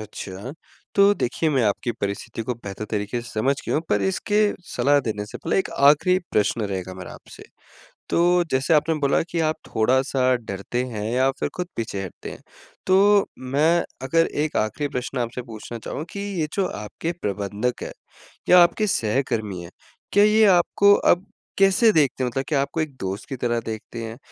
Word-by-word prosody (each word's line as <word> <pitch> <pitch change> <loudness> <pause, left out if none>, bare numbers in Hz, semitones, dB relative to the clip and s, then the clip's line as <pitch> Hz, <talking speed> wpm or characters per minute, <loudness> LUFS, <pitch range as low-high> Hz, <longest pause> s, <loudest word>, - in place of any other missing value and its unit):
अच्छा। 105 +2 -7 0.4
तो 200 0 +6
देखिए, 155 +1 -1
मैं 135 -4 +2
आपकी 110 +3 0
परिस्थिति 100 +3 -4
को 125 +2 -3
बेहतर 105 -2 -7
तरीके 105 +3 -2
से 120 - -10
समझ 130 +6 +1
गया - - -1
हूँ। 155 - +1
पर 105 -1 +1
इसके 205 - +1 0.2
सलाह 140 +4 +3
देने 105 -5 -3
से - - -9
पहले 165 - 0
एक - - -1
आखिरी 150 +6 +5
प्रश्न 105 +2 +1
रहेगा 95 -1 -5
मेरा 90 -1 -9
आपसे। - - -14 0.7
तो 175 +1 +3
जैसे 130 +5 +2
आपने 155 +2 +3
बोला 140 -1 +2
कि 170 0 -4
आप 155 - 0
थोड़ा-सा 130 +2 +2
डरते 115 +2 -4
हैं 110 -4 -5
या 130 +2 +3
फिर - - -1
खुद 180 -1 -3
पीछे 110 -4 -3
हटते 95 - -8
हैं। - - -11 0.5
तो 200 +2 +5
मैं 150 +7 +2 0.2
अगर 165 +5 +2 0.2
एक 155 - -3
आखिरी 125 +7 -1
प्रश्न 125 0 -4
आपसे 120 +1 -3
पूछना 115 0 -8
चाहूँ 150 - -5
कि 200 - -6 0.2
ये 155 - 0
जो 195 -2 +1
आपके 105 +11 -5
प्रबंधक 105 +4 -2
है - - -6 0.6
या 180 - +8
आपके 210 +5 +1
सहकर्मी 110 - -1
हैं, 85 - -11 0.4
क्या 205 +1 +6
ये 215 +1 +5
आपको 200 +2 +5
अब 180 -1 +2 0.3
कैसे 195 +3 +5
देखते 135 -4 +2
हैं? 125 - 0
मतलब 135 +3 -2
क्या 145 -3 +1
आपको 155 +3 -2
एक 150 -4 -4
दोस्त 95 +2 -4
की 135 - -3
तरह 120 -1 0
देखते 115 +1 -6
हैं? 115 +1 -7
130 Hz, 185 wpm, -23 LUFS, 110-165 Hz, 0.7 s, या